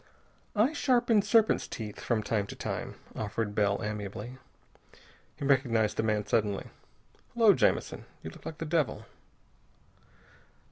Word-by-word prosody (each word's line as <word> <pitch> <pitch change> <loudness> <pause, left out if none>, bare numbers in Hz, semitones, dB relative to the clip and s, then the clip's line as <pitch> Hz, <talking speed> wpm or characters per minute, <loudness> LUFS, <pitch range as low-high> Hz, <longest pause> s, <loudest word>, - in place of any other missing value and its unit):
"I 225 +8 +3
sharpen 240 -7 +3
serpents' 220 +1 +3
teeth 105 -3 -6
from 115 -3 0
time 105 -2 -1
to - - -8
time," - - -4 0.2
offered 105 0 -3
Bell 100 -1 +1
amiably. 105 +4 -5 1.0
He 140 - -5
recognized 120 -6 +2
the - - +1
man, 105 -2 0
suddenly. 105 -2 0 0.6
"Hullo, 225 -3 +7
Jamison, - - +1 0.2
you 80 - -6
look - - -15
like 160 - -6
the 165 - -4
devil." 150 -7 0
115 Hz, 130 wpm, -30 LUFS, 105-165 Hz, 1.0 s, Hullo